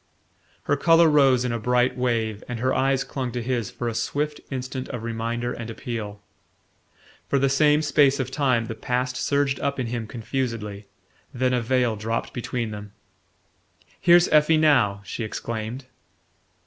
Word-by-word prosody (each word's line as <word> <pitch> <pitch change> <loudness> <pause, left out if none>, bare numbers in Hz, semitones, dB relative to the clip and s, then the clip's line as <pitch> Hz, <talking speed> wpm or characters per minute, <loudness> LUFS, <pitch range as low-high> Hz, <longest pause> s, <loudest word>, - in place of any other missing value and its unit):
Her 145 - +1
colour 165 +3 +5
rose 135 -5 +4
in 125 - -1
a 115 - -2
bright 125 +2 +2
wave, 115 -4 -1
and 120 -2 -4
her 130 +2 +1
eyes 135 0 +1
clung 130 -3 -4
to 125 - -2
his 120 -3 -1
for 120 0 -5
a 115 - -1
swift 145 +6 -2
instant 130 -1 -5
of 120 -4 -5
reminder 115 +1 -3
and 115 -1 -7
appeal. 110 -4 -6 1.0
For 140 - +1
the 135 0 +2
same 150 +2 +3
space 145 -2 +3
of 130 -1 -2
time 130 -4 +1
the 115 - -5
past 125 +2 -2
surged 140 0 0
up 140 -1 -2
in 130 - -1
him 115 -1 -4
confusedly; 115 -4 -4 0.5
then 125 0 +1
a 125 - +1
veil 120 -1 +1
dropped 115 +2 -3
between 120 -2 -3
them. 105 -1 -8 1.1
"Here's 175 0 +6
Effie 155 +1 +5
now!" 120 -11 +3
she 115 - -5
exclaimed. 115 +3 -5
125 Hz, 160 wpm, -24 LUFS, 115-135 Hz, 1.1 s, Here's